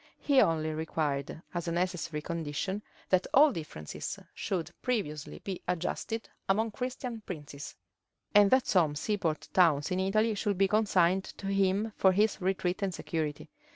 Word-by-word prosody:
He 280 -3 +4
only 155 -1 +2
required, 155 -1 -2
as 175 -1 -3
a - - 0
necessary 170 -3 -2
condition, 170 +5 -3 0.3
that 185 0 +3
all 290 +2 +8
differences 150 - -6 0.2
should 175 -4 -3
previously 155 - -2
be 190 -3 -4
adjusted 180 +6 -2 0.2
among 220 +3 +2
Christian 250 -1 -4
princes, 145 -5 -7 0.6
and 205 -1 +7
that 260 +2 +4
some 160 -6 +3
seaport 165 -2 -1
towns 160 -5 +4
in 185 - +1
Italy 215 +4 +2
should 200 -1 -1
be 195 +1 +4
consigned 190 -3 +3
to - - -8
him 195 +2 +1
for 190 -1 +5
his 210 +2 +2
retreat 185 0 0
and 190 -3 -1
security. 155 -3 -3
185 Hz, 150 wpm, -30 LUFS, 160-205 Hz, 0.6 s, all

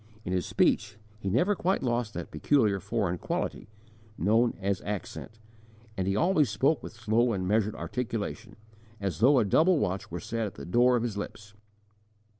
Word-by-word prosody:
In 90 - -2
his 90 -2 -1
speech, 100 0 +1 0.2
he 100 - -3
never 155 - +2
quite 190 0 0
lost 120 -3 -1
that - - -6
peculiar 110 -9 +2
foreign 95 -3 -1
quality, - - -3 0.5
known 115 +5 +2
as 100 -1 -1
accent, 105 +2 -6 0.6
and 95 -1 -2
he 95 - +1
always 155 - +3
spoke 135 +10 +1
with - - -8
slow 115 +1 +1
and 95 -2 -2
measured 105 +1 +1
articulation, 110 - -4 0.4
as 95 -5 -3
though 135 +6 +5
a 120 - +4
double 160 - +4
watch 95 -6 -2
were 85 - -5
set 115 +4 -3
at 100 - -9
the - - -8
door 120 +6 +4
of 120 - 0
his 115 -4 -3
lips. 105 +1 -7
110 Hz, 175 wpm, -28 LUFS, 100-120 Hz, 0.6 s, though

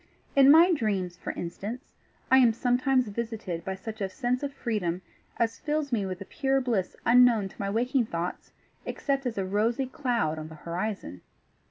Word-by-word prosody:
In 275 -1 +7
my 335 +5 +8
dreams, 195 - -1
for - - -7
instance, 205 +8 -6 0.4
I 260 - +8
am 240 -3 +5
sometimes 250 +1 +1
visited 210 -6 -4
by 190 +1 -3
such 215 +3 -8
a 195 - -1
sense 245 +4 -1
of 285 -1 -3
freedom 205 -10 -2 0.3
as 230 -1 0
fills 300 -2 -2
me 210 -5 0
with 185 -1 -5
a - - -6
pure 270 +2 0
bliss 230 -8 -1
unknown 235 -4 +5
to - - -18
my 195 - -1
waking 240 +3 +1
thoughts 170 -1 -4 0.3
except 275 -2 -2
as 230 - -4
a 195 - 0
rosy 220 +7 0
cloud 240 - -1
on 155 - -6
the 160 - -11
horizon. 170 - -4
225 Hz, 180 wpm, -28 LUFS, 190-255 Hz, 0.4 s, my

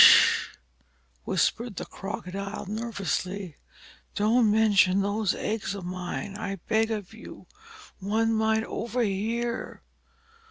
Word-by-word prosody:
"Sh!" - - +7 0.8
whispered 235 -3 0
the - - -4
Crocodile, 195 +1 -5
nervously. 200 -4 -3 0.6
"Don't 220 +2 +4
mention 205 -3 +4
those 205 -1 0
eggs 210 -2 -2
of 190 -3 -6
mine, 180 +2 -4
I 200 -2 -3
beg 220 +4 +1
of 210 -2 -4
you. 225 - -11 0.6
Some 195 - -5
one 225 +1 +2
might 220 0 +2
overhear. 230 +1 -2
210 Hz, 110 wpm, -27 LUFS, 195-225 Hz, 0.8 s, Sh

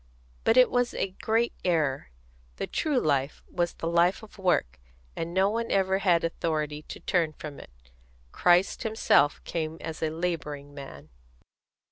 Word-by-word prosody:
But 225 - +4
it 255 - +7
was 245 -1 +1
a 195 - -1
great 230 +2 +1
error. 150 - 0 0.5
The - - -3
true 300 -5 0
life 140 - 0
was 175 -1 -1
the - - -7
life 170 +5 +2
of 210 -1 -14
work, 60 - +1 0.4
and 165 +1 -4
no 190 +2 +3
one 230 +1 -2
ever 190 0 +2
had 175 -4 +3
authority 155 -3 -2
to - - -9
turn 165 -4 0
from 150 -1 -8
it. - - -12 0.6
Christ 180 +2 +3
Himself 220 -10 +2
came 160 -1 -3
as 160 -1 -6
a 160 - +1
labouring 155 -4 -4
man." 75 - -10
170 Hz, 155 wpm, -27 LUFS, 150-195 Hz, 0.6 s, it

